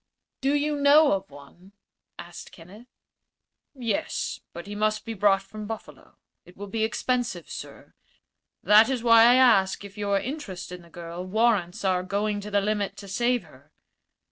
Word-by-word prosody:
"Do 275 +2 +1
you 295 0 0
know 290 +2 +6
of 195 0 -2
one?" 145 +7 -16 0.4
asked 175 0 -10
Kenneth. 195 +8 -15 0.9
"Yes; 235 -6 -3
but 170 - -9
he 205 - -7
must 215 +1 -1
be 225 - -4
brought 195 -1 +2
from 210 +2 -9
Buffalo. 225 0 -10 0.3
It 180 - -18
will 205 - -7
be 220 +2 -3
expensive, 230 -5 -2
sir. - - -10 0.7
That 210 +5 +6
is 255 -3 -2
why 230 -1 +7
I 240 +1 +6
ask 205 -7 +3
if 200 +1 -12
your 200 -1 +1
interest 200 - -6
in 180 0 -8
the 170 - -18
girl 170 +1 -8
warrants 200 -2 0
our 185 -1 +2
going 205 +3 -2
to 210 - -7
the 205 -1 +1
limit 205 0 -2
to 200 - -10
save 240 +5 0
her." - - -20
205 Hz, 170 wpm, -25 LUFS, 190-235 Hz, 0.9 s, why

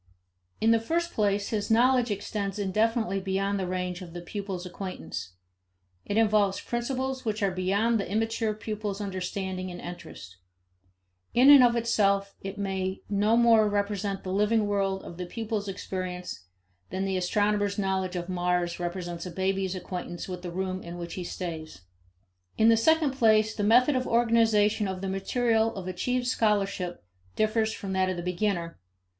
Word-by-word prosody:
In 225 - +4
the 230 - +5
first 340 +9 -1
place, 205 -1 +1
his 210 -2 -2
knowledge 245 +2 +4
extends 205 -1 -3
indefinitely 215 +1 +1
beyond 195 +1 -1
the 185 - -2
range 180 0 -3
of 170 -2 -9
the 175 - -6
pupil's 190 0 -5
acquaintance. 180 - -6 0.7
It 205 - -2
involves 210 -3 +3
principles 260 +2 -3
which 215 -3 -2
are 195 - +2
beyond 200 +5 +1
the 195 - -4
immature 225 0 0
pupil's 210 -2 -4
understanding 190 -1 -3
and 175 0 -7
interest. 170 - -9 1.0
In 260 +4 +8
and 280 -3 +10
of 240 -1 +4
itself, 200 -4 +1
it 195 +1 -6
may 190 -1 -2
no 210 +3 +3
more 225 -3 +5
represent 205 -1 -1
the 185 - -3
living 210 +2 +2
world 195 -1 0
of 170 - -9
the 180 -1 -5
pupil's 215 0 -3
experience 185 - -5 0.4
than 190 +2 -2
the 190 -1 -1
astronomer's 205 +2 +1
knowledge 190 -2 -1
of 175 -1 -3
Mars 180 -1 0
represents 175 0 -4
a - - -6
baby's 190 +1 -1
acquaintance 180 -1 -5
with 180 -1 -6
the 180 - -5
room 185 +1 -3
in 170 +1 -8
which 170 -1 -6
he 185 - -4
stays. 160 - -6 0.8
In 220 +1 +5
the 230 - +6
second 315 +5 +3
place, 220 -4 +3
the 210 - -4
method 250 +7 +5
of 255 0 0
organization 225 -3 +3
of 190 -1 -4
the 195 - -2
material 225 +3 +1
of 190 -2 -6
achieved 245 +8 -1
scholarship 200 - 0 0.3
differs 220 0 +1
from 195 -3 -5
that 190 0 +2
of 185 - -2
the 175 - -4
beginner. 180 - -2
200 Hz, 165 wpm, -28 LUFS, 185-220 Hz, 1.0 s, and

